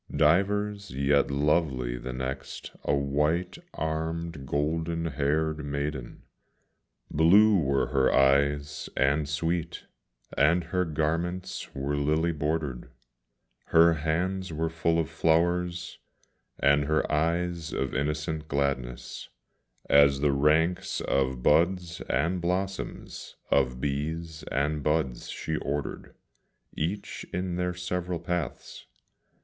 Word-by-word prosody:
Divers, 100 +5 +2
yet 70 +2 +2
lovely 70 -4 +1
the 60 +1 -6
next, 65 +2 -5
a 70 - +2
white 75 - 0 0.2
armed, 80 -2 -3
golden 80 +3 -1
haired 75 +1 0
maiden; 70 -3 -4 0.9
Blue 100 +6 +6
were 70 -3 +1
her 65 -1 +3
eyes 70 +2 +2
and 70 +2 +2
sweet, 85 +3 -2 0.5
and 85 +5 +3
her 90 +2 -1
garments 85 +4 -2
were 70 +2 -2
lily 75 +4 +1
bordered; 75 -4 -2 0.8
Her 85 0 +5
hands 90 +4 -1
were 80 +1 -2
full 85 0 +1
of 80 -2 +1
flowers, 85 +2 0 0.6
and 70 +1 +3
her 75 +2 0
eyes 85 +1 0
of 65 - -2
innocent 75 +3 -2
gladness, 70 -4 -2 0.6
As 70 -1 +5
the 75 -1 +3
ranks 80 +6 +2
of 65 -2 0
buds 85 +1 +2
and 90 +2 +1
blossoms, 95 +3 -3 0.2
of 65 -1 +2
bees 80 +4 -3
and 75 +2 0
buds 75 -4 -1
she 80 -1 -3
ordered, 70 0 -4 0.6
Each 90 +7 -3
in 90 0 -2
their 90 0 -1
several 90 0 -3
paths. 85 -3 -4
80 Hz, 110 wpm, -28 LUFS, 70-85 Hz, 0.9 s, Blue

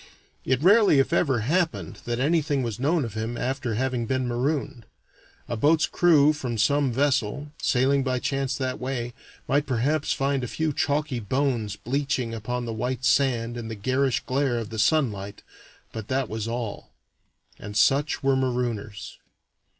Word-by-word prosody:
It 130 +2 +1
rarely 200 -3 +6
if 135 +4 +2
ever 135 -9 +2
happened 165 +8 -1
that 120 0 -2
anything 145 -1 +1
was 115 -3 -4
known 150 +2 +1
of 115 - -7
him 110 +2 -3
after 130 -3 -2
having 125 -1 -1
been 130 0 0
marooned. 125 -2 -2 0.6
A 120 - -2
boat's 150 +6 +3
crew 155 -4 +4
from 125 -6 -4
some 140 +4 +2
vessel, 140 +1 0
sailing 135 +2 +2
by 130 -1 0
chance 135 +1 -1
that 130 -1 -3
way, 125 -2 -3 0.3
might 145 +2 +1
perhaps 140 +5 0
find 135 -1 0
a - - -2
few 155 +4 -1
chalky 145 -3 0
bones 115 -2 -1
bleaching 130 +1 -2
upon 120 +2 -3
the 115 - -4
white 125 +3 -3
sand 120 -4 +2
in 115 -2 -5
the 110 - -5
garish 130 +5 0
glare 130 -2 0
of 115 -1 -5
the 110 - -4
sunlight, 105 -6 0 0.5
but 110 -2 -7
that 130 -1 0
was 110 0 -3
all. 115 -3 -5 0.7
And 105 0 -6
such 140 +9 +2
were 135 0 +3
marooners. 120 -5 -3
130 Hz, 160 wpm, -25 LUFS, 115-140 Hz, 0.7 s, rarely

